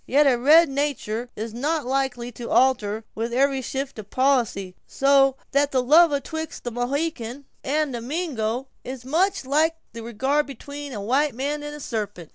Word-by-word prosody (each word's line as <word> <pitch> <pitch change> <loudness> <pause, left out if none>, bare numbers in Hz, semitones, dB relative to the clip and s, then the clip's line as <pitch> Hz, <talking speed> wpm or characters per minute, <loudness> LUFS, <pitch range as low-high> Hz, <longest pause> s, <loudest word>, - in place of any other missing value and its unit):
Yet 290 +3 +4
a 270 -3 +5
red 305 +7 +6
natur' 270 -5 -2
is 220 +1 -5
not 295 +5 -1
likely 255 -2 -1
to 235 0 -8
alter 225 -5 +2
with 230 +2 -3
every 270 +2 +2
shift 270 -1 -4
of 210 -1 -9
policy; 240 -8 +1
so 275 -1 +4 0.2
that 280 +1 +2
the 255 -2 +1
love 320 +5 +6
atwixt 315 +2 -4
a 240 - -2
Mohican 260 +1 -3 0.2
and 290 -1 0
a 235 - -4
Mingo 255 -4 -2 0.2
is 255 -1 -7
much 360 +4 +1
like 310 +4 +2 0.2
the 230 - -7
regard 265 +6 0
between 285 +2 -8
a 215 - -5
white 265 +5 +1
man 290 +4 -2
and 295 0 -6
a - - -9
sarpent." 205 - -5
270 Hz, 175 wpm, -24 LUFS, 235-290 Hz, 0.2 s, red